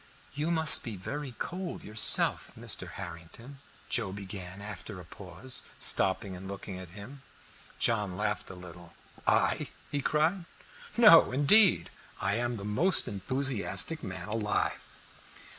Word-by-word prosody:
"You 150 +3 -3
must 160 -2 +6
be 115 -4 -6
very 135 +8 -7
cold 180 0 -6
yourself, 110 +1 +3
Mr. - - -3
Harrington," 115 +12 -11 0.3
Joe 110 -6 -1
began 95 -2 -8
again 100 - -13
after 105 -1 -9
a 90 - -12
pause, 100 +9 -5 0.2
stopping 95 0 +1
and 95 +1 -10
looking 100 -1 -8
at 90 -2 -11
him. 130 +7 -11 0.6
John 105 -6 0
laughed 105 -1 -3
a 95 - -10
little. 90 -1 -14 0.3
"I?" - - +1 0.2
he 145 - -2
cried. 160 +6 -1 0.5
"No, 210 -9 +7
indeed, 170 +9 +4 0.3
I 95 +1 -1
am 120 0 -3
the 100 - -8
most 165 - +3
enthusiastic 130 - +2
man 95 +2 -7
alive." 105 -1 -3
105 Hz, 135 wpm, -28 LUFS, 95-145 Hz, 0.6 s, No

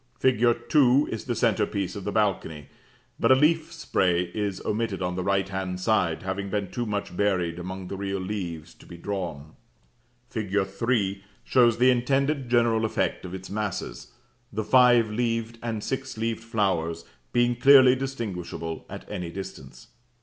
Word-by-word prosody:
Fig. 130 -4 +2 0.3
2 135 +1 +4
is 110 - -5
the 120 - -2
centre 110 -2 +2
piece 95 -3 -3
of 100 - -7
the 105 - -1
balcony, 95 -9 -1 0.5
but - - +3
a - - +9
leaf 160 +3 +2
spray 90 - 0
is 100 -3 -2
omitted 110 -2 -1
on 90 -1 -2
the 90 - -2
right 95 0 +1
hand 95 -1 -4
side, 90 -4 +1
having 100 +1 -3
been 100 -1 -2
too 120 -1 -3
much 100 -3 -3
buried 90 -4 0
among 95 +1 -6
the 100 - -5
real 100 0 -3
leaves 90 -5 -5
to - - -18
be 85 - -10
drawn. 85 -6 -5 0.7
Fig. 105 -4 -3
3 100 -1 -1 0.2
shows 120 -3 +4
the 125 +2 +5
intended 135 +2 0
general 115 -2 +3
effect 110 - -1
of 90 +1 -6
its 95 0 -9
masses, 105 -2 -4 0.4
the 110 +1 -2
five 120 -2 +5
leaved 115 0 -2
and 115 -3 -3
six 135 -2 -4
leaved 115 0 -2
flowers 95 -8 -1 0.3
being 120 0 +2
clearly 130 0 +7
distinguishable 100 -11 -5
at - - -8
any 90 -5 -5
distance. 65 -8 -9
105 Hz, 165 wpm, -26 LUFS, 95-120 Hz, 0.7 s, a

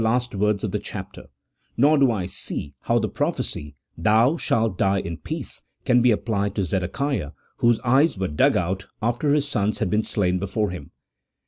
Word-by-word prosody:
last 120 +2 +1
words 105 0 +1
of 105 - -1
the 105 - -1
chapter, - - -8 0.5
nor 145 +5 +5
do 135 -4 +4
I 100 -5 -2
see 75 -5 -4
how - - +3
the - - +1
prophecy, 75 -1 -3 0.2
"thou 110 - +3
shalt 115 - +1
die 95 +1 +2
in 85 -3 -4
peace," - - -5 0.2
can 125 -1 +4
be 125 - +5
applied 100 -3 0
to 100 - 0
Zedekiah, 95 - -2 0.2
whose 120 -1 +3
eyes 135 +2 +3
were 95 0 -1
dug 75 -2 +3
out 95 +2 -2
after 120 +6 0
his 145 -1 +1
sons 105 -6 0
had 90 - -1
been 105 +1 +3
slain 90 -4 0
before 100 +2 -1
him. 90 -6 -8
105 Hz, 185 wpm, -23 LUFS, 95-120 Hz, 0.5 s, nor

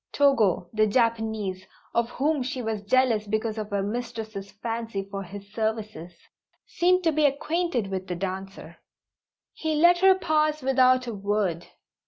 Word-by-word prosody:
Togo, 225 -11 +3
the 215 0 +3
Japanese 220 -4 0 0.3
(of 235 0 +1
whom 290 +3 0
she 260 +1 -3
was 220 -3 -3
jealous 225 -1 +2
because 220 +1 -1
of 210 -1 -5
her 200 -1 -1
mistress's 220 -2 -5
fancy 225 -1 -4
for 195 0 -6
his 200 +2 -10
services), 215 -6 -3 0.5
seemed 365 +1 +2
to 325 - +3
be 305 0 +2
acquainted 300 - -1
with 190 0 -4
the 180 - -3
dancer. 190 +1 -6 0.8
He 315 -1 -2
let 345 +3 +5
her 380 +1 +6
pass 310 -4 +1
without 255 -1 +4
a 235 - -4
word. 200 -4 -1
225 Hz, 150 wpm, -26 LUFS, 200-270 Hz, 0.8 s, her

